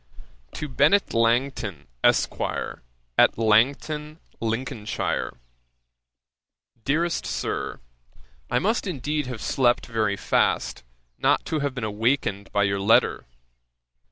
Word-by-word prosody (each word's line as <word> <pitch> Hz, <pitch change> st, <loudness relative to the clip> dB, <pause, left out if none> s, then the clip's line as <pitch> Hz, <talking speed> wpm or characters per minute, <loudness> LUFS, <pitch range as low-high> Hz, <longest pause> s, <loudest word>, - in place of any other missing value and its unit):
'To 150 Hz, -, -4 dB
BENNET 195 Hz, +9 st, +3 dB
LANGTON, 115 Hz, -, +1 dB, 0.2 s
ESQ., -, -, +2 dB, 0.8 s
AT -, -, +5 dB
LANGTON, 140 Hz, +8 st, +2 dB, 0.2 s
LINCOLNSHIRE. 115 Hz, -, -2 dB, 1.5 s
'DEAREST 160 Hz, +5 st, 0 dB
SIR, -, -, -3 dB, 0.7 s
'I -, -, +1 dB
must 220 Hz, +2 st, 0 dB
indeed 150 Hz, -3 st, -2 dB
have 125 Hz, -4 st, -6 dB
slept 120 Hz, -2 st, +2 dB
very 110 Hz, -4 st, 0 dB
fast, -, -, 0 dB, 0.4 s
not -, -, +2 dB
to 155 Hz, -, -1 dB
have 140 Hz, -2 st, -2 dB
been 125 Hz, -, -4 dB
awakened 105 Hz, -2 st, 0 dB
by 100 Hz, -, +2 dB
your 100 Hz, 0 st, +1 dB
letter. 100 Hz, -, +3 dB
120 Hz, 100 wpm, -25 LUFS, 110-150 Hz, 1.5 s, AT